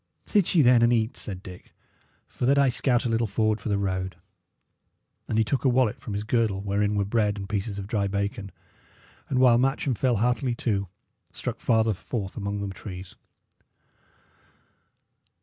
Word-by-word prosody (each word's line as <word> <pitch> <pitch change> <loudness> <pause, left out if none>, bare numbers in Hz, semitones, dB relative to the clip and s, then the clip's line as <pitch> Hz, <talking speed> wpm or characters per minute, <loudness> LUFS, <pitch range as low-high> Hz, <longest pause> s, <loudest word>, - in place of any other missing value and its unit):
"Sit 200 -4 +2
ye, 160 - +6
then, 120 -1 +6
and 120 +1 +4
eat," 115 0 +1
said 95 -2 -6
Dick, 90 -1 -12 0.7
"while 125 - +1
that 140 +1 +4
I 140 -1 +5
scout 125 0 +1
a - - 0
little 115 0 +1
forward 110 +1 0
for - - -4
the 100 - +1
road." 95 -2 -2 1.1
And 110 - -1
he 110 - +4
took 125 +5 -1
a 135 - +4
wallet 125 -3 +2
from 105 - -6
his 105 - -2
girdle, 110 -3 +1
wherein 100 +1 0
were 100 -1 +1
bread 105 -1 +1
and 100 -1 -6
pieces 100 0 -3
of 100 - -5
dry 100 -1 -1
bacon, 100 +2 -3 0.8
and, 130 - 0
while 125 -2 +5
Matcham 135 +2 +1
fell 125 +1 +1
heartily 125 +3 0
to, 100 -5 -1 0.4
struck - - -5
farther 110 -1 +2
forth 100 0 -5
among 100 -1 -3
the 95 - -6
trees. 90 -1 -9
110 Hz, 175 wpm, -26 LUFS, 100-120 Hz, 1.1 s, ye